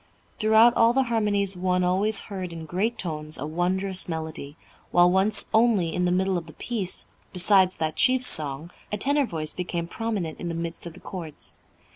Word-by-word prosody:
Throughout 220 +2 +5
all 230 +1 +4
the 270 +1 +3
harmonies 205 -3 +1
one 180 0 0
always 200 +4 +2
heard 185 -3 -6
in 165 -1 -8
great 200 +9 -2
tones 155 -3 -4
a 140 - -5
wondrous 185 +4 -1
melody, 160 -2 -6 0.3
while 175 0 +4
once 195 +3 +2
only 220 -8 +3
in 180 - 0
the 175 - +1
middle 185 0 +1
of 165 - -13
the 155 - -12
piece, 210 -7 -4 0.3
besides 185 0 +4
that 155 -1 -3
chief 255 0 +3
song, 155 - +3 0.2
a 210 - -1
tenor 280 +4 +1
voice 155 -4 -4
became 175 -2 -4
prominent 200 -6 -4
in 175 - -5
the 165 - -4
midst 170 0 -5
of 170 - -9
the 180 - -14
chords. 165 -5 -9
180 Hz, 185 wpm, -25 LUFS, 165-210 Hz, 0.3 s, Throughout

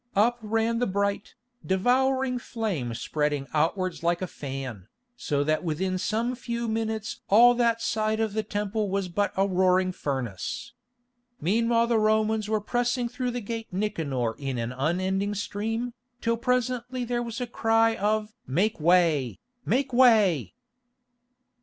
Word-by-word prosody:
Up 235 +4 +3
ran 225 +1 0
the 245 - +1
bright, 200 +1 -1 0.3
devouring 255 +6 +2
flame 195 - -3
spreading 150 +1 -1
outwards 170 +4 0
like 170 +1 +1
a - - +1
fan, 135 - -6 0.3
so 145 -12 -1
that 155 +3 0
within 185 +3 -1
some 225 +6 0
few 235 -1 -4
minutes 220 -1 -3
all 240 +4 +7
that 235 -1 +1
side 220 -1 0
of 220 -2 0
the 220 - 0
Temple 210 0 -2
was 195 -1 -1
but 200 +4 0
a 195 +1 +3
roaring 185 0 +3
furnace. 130 - -4 0.7
Meanwhile 230 +6 +2
the 235 -1 +2
Romans 215 0 +1
were 215 -1 +2
pressing 245 +3 -1
through 250 +1 -3
the 245 0 -3
Gate 225 +1 -5
Nicanor 160 - -1
in 135 -3 -3
an 115 0 -2
unending 185 +9 -1
stream, 225 +4 -3 0.3
till 230 -1 +1
presently 250 0 -1
there 240 0 -1
was 235 0 -5
a 250 - -1
cry 225 -1 +2
of 215 +1 0
"Make 180 - +1
way! 160 -6 +3 0.3
Make 260 +2 +1
way!" 220 - +4
215 Hz, 145 wpm, -26 LUFS, 180-235 Hz, 0.7 s, all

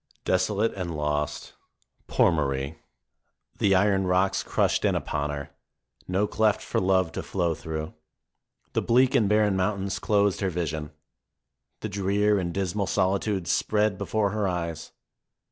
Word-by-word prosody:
Desolate 100 +4 +1
and 85 -5 -4
lost, 75 0 -2 0.5
poor - - +3
Marie! 70 -1 -2 0.8
The 95 -1 +4
iron 95 0 +3
rocks 95 +2 +2
crushed - - 0
in - - +2
upon 75 -1 -2
her; 75 0 -5 0.6
no 95 +3 +1
cleft 110 0 +1
for - - -1
love 95 -2 +2
to - - -4
flow 85 0 -1
through. 80 0 -5 0.8
The - - +1
bleak 130 +3 +3
and 115 -7 +3
barren 105 -2 +3
mountains 95 0 -1
closed 100 -2 +1
her 95 - +1
vision. 80 -3 -3 0.9
The 110 - -3
drear 100 +1 +1
and 85 -2 -2
dismal 95 +1 -1
solitudes 95 -1 0
spread 105 -2 +1
before 105 -2 0
her 105 -1 0
eyes. 85 -3 -4
95 Hz, 140 wpm, -26 LUFS, 85-105 Hz, 0.9 s, The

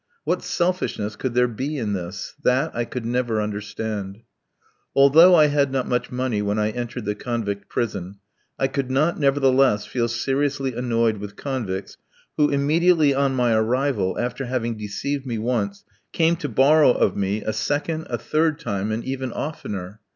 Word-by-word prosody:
What - - 0
selfishness 175 - -1
could 130 -3 -4
there 125 0 +4
be 135 +6 -4
in 110 -5 -2
this? 95 +1 -5
That 130 +6 +2
I 120 0 -1
could 125 -1 -6
never 120 -2 0
understand. 105 -1 -4 0.7
Although 160 +7 +7
I 155 -3 +7
had 145 -2 +2
not 130 -1 -1
much 125 -1 -1
money 125 -4 -1
when 105 +1 -1
I 105 0 +1
entered 120 0 -5
the 105 - 0
convict 105 -2 -4
prison, 100 -4 -3 0.4
I 135 - +1
could 135 -1 -2
not 150 +7 +1
nevertheless 135 -6 +3
feel 120 +1 -1
seriously 135 +3 -1
annoyed 115 -2 +1
with 100 0 -8
convicts 105 -9 -4 0.4
who, 150 -1 +3
immediately 155 +2 +3
on 135 -1 +1
my 120 -2 +2
arrival, 110 -3 +1
after 125 +2 -2
having 120 -2 -2
deceived 130 +7 -4
me 120 -2 -2
once, 110 -3 -2 0.3
came 165 0 +2
to 145 - -4
borrow 140 +6 +5
of - - +1
me 100 +1 -1
a 110 - -2
second, 145 +8 -2
a - - -1
third 155 0 0
time, 105 -7 -2
and 110 +2 -3
even 130 -1 -3
oftener. 105 - -5
125 Hz, 165 wpm, -23 LUFS, 105-140 Hz, 0.7 s, Although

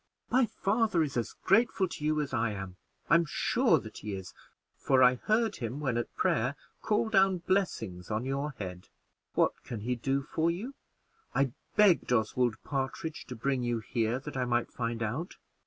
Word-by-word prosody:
"My 255 -1 +4
father 210 -4 +1
is 145 - -4
as 115 -4 -1
grateful 195 -1 +3
to 170 - -8
you 155 0 +2
as 145 - -4
I 110 -1 +1
am 95 -2 -6 0.3
I'm 170 +2 +5
sure 150 - +2
that - - -8
he 105 -1 -4
is 95 -1 -8 0.4
for 130 -1 +3
I 125 0 +7
heard 215 - +1
him, 120 +2 -4
when 135 -5 -1
at 120 - -3
prayer, 125 +4 +1 0.3
call 215 +1 +1
down 195 -3 +4
blessings 170 - -1
on 110 +3 -1
your 140 +2 -2
head. 90 -2 -7 0.5
What - - +1
can 115 -4 -6
he 125 +4 -1
do 135 +3 -1
for 160 +3 0
you? 205 +11 -3 0.6
I 135 -2 +2 0.2
begged 205 - +5
Oswald 120 0 +2
Partridge 140 +3 -3
to 125 - -6
bring 130 +3 0
you 120 -1 0
here 115 +1 -1
that 135 - -8
I 130 -1 0
might 120 -1 0
find 115 -1 -2
out. 135 - -3
135 Hz, 180 wpm, -30 LUFS, 115-170 Hz, 0.6 s, I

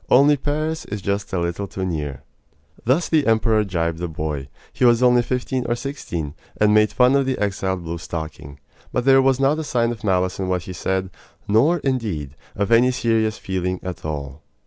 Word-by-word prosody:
Only 140 +3 +6
Paris 155 +3 -2
is 105 - -5
just 100 +1 -2
a 95 - -1
little 85 +4 -2
too 95 -1 -4
near!" 75 -7 -4 0.6
Thus 135 +9 +2
the 155 -5 +2
emperor 110 -1 +3
gibed 85 -4 -2
the 90 - -2
boy 75 -4 -4 0.3
he - - -2
was 120 0 +5
only 125 -1 +5
fifteen 125 +1 -2
or 120 - +1
sixteen 120 - -5 0.3
and 105 0 +4
made 105 0 +4
fun 125 +2 +4
of 140 -1 +2
the 130 - 0
exiled 95 -3 -1
blue 85 0 -5
stocking; 75 -3 -7 0.3
but 125 - -1
there 135 0 +6
was 135 0 +2
not 140 +3 +2
a - - -2
sign 120 -5 0
of 115 -3 -8
malice 95 -2 +1
in 95 - -1
what 90 -2 -1
he 90 - -7
said, 95 +1 -2 0.4
nor, 135 +12 +4
indeed, 100 - -2 0.2
of 100 +2 -1
any 120 +2 +6
serious 115 -3 +1
feeling 90 -1 -2
at 90 -1 -6
all. 75 -2 -5
105 Hz, 195 wpm, -22 LUFS, 85-125 Hz, 0.6 s, Only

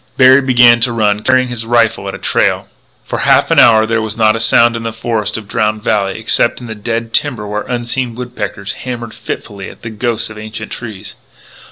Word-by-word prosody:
Berry 130 +1 +7
began 120 -3 +5
to 120 +1 +1
run, 105 -2 +1
carrying 130 +1 +2
his 120 -2 -5
rifle 115 -3 +1
at 100 - -4
a - - -6
trail. - - 0 0.4
For - - -4
half - - +3
an - - +5
hour 110 -1 +6
there 115 0 0
was 110 0 -5
not 110 -1 +3
a - - -2
sound 115 +1 +3
in 115 - -4
the 115 0 -3
forests 110 -2 -2
of 110 -2 -9
Drowned 105 0 -1
Valley 100 -4 0
except 110 +1 0
in 125 - -9
the 110 - -6
dead 115 +2 -4
timber 125 -7 -1
where 105 +1 -3
unseen 120 0 -3
woodpeckers 105 -5 -5
hammered 120 -3 -6
fitfully 100 -3 -7
at - - -16
the 115 - -6
ghosts 110 0 -2
of 110 - -10
ancient 110 0 -7
trees. 105 -4 -7
115 Hz, 210 wpm, -14 LUFS, 105-120 Hz, 0.4 s, Berry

